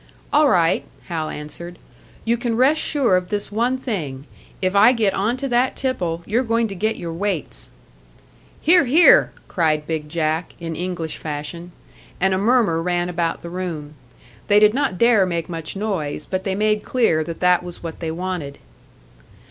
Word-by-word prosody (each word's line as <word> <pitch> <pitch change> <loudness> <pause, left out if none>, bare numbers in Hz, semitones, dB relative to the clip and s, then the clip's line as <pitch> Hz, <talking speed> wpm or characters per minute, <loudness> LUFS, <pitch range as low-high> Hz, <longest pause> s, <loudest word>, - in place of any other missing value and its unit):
"All 295 0 +5
right," 170 -6 +3 0.3
Hal 160 -3 -2
answered. 170 +4 -8 0.5
"You 230 +1 +2
can 235 -1 -2
rest 275 +5 +4
sure 270 -10 +2
of 180 0 -1
this 205 -1 -3
one 240 +5 +1
thing 155 - -4 0.3
if 185 +1 -1
I 215 +5 +7
get 215 -5 +1
onto 240 +8 -1
that 245 +1 +2
tipple, 175 -11 -2
you're 230 +4 +1
going 230 -2 +1
to - - -5
get 220 +4 0
your 170 -1 -6
weights!" 170 - -3 0.9
"Hear, 340 0 +5
hear!" 310 +8 +6 0.2
cried 155 -4 0
"Big 155 -1 -4
Jack," 160 +1 -1
in 165 -1 -5
English 175 -2 -4
fashion. 155 +3 -6 0.5
And 190 +1 +2
a 185 - +1
murmur 210 -6 +2
ran 175 0 -1
about 170 -1 -2
the 170 - -6
room. 165 -5 -5 0.5
They 205 0 +5
did 210 0 +5
not 255 -8 0
dare 225 -4 +4
make 170 -2 -2
much 165 -1 -5
noise, 185 -8 -3
but 185 0 -3
they 190 -1 -1
made 215 +1 +1
clear 215 -10 +1
that 165 +1 -7
that 180 -1 +4
was 175 -1 -9
what 165 -1 -6
they 165 - -3
wanted. 170 -4 -4
185 Hz, 170 wpm, -21 LUFS, 165-225 Hz, 0.9 s, I